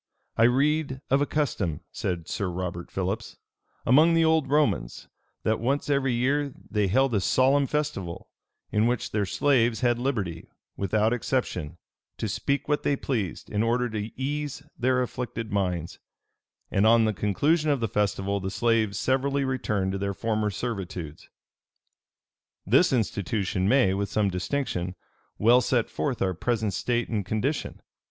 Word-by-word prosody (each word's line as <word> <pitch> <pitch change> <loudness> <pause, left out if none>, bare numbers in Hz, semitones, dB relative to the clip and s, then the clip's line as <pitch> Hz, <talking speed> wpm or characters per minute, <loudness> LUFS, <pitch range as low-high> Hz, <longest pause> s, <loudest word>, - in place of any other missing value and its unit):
"I 115 - +5
read 140 +2 +2
of 135 +1 +4
a 145 - +1
custom," 110 - -1
said 85 -3 -3
Sir 100 - -2
Robert 85 -1 -4
Philips, 95 +4 -3 0.5
"among 155 +7 +5
the 165 0 +4
old 160 -4 +2
Romans, 140 - 0 0.4
that 110 - +1
once 140 +5 0
every 135 -2 +2
year 140 +4 +1 0.2
they 105 -2 +2
held 130 +6 +2
a 100 - +2
solemn 135 +7 +3
festival, 135 - -3 0.4
in 105 +2 +3
which 120 -1 -1
their 105 -2 0
slaves 120 -1 +2
had 120 -1 +2
liberty, 105 -11 -2 0.3
without 110 +3 +1
exception, 100 - -2 0.4
to 110 - -2
speak 140 +7 -1
what 150 -1 +1
they 140 - +1
pleased, 110 -10 -3
in 105 - 0
order 120 +2 +1
to 105 0 -3
ease 145 0 -3
their 125 +1 +2
afflicted 115 -2 -5
minds; 90 -5 -2 0.7
and, 100 +3 +3
on 115 0 +6
the 110 - +1
conclusion 145 - +1
of 140 -2 +2
the 115 - 0
festival, 100 -1 0
the 95 0 -3
slaves 110 -1 +1
severally 135 +3 +1
returned 105 -7 -1
to 95 - -3
their 100 0 -2
former 110 -1 0
servitudes. 95 -7 -5 1.4
"This 130 - +4
institution 100 -4 0
may, 125 -7 +4
with 100 0 -2
some 105 -1 +1
distinction, 90 -2 -2 0.4
well 120 +4 +5
set 120 -2 0
forth 130 -7 -1
our 95 -1 0
present 110 +2 -1
state 120 -1 0
and 105 -3 -1
condition. 110 - -2
115 Hz, 150 wpm, -26 LUFS, 100-135 Hz, 1.4 s, on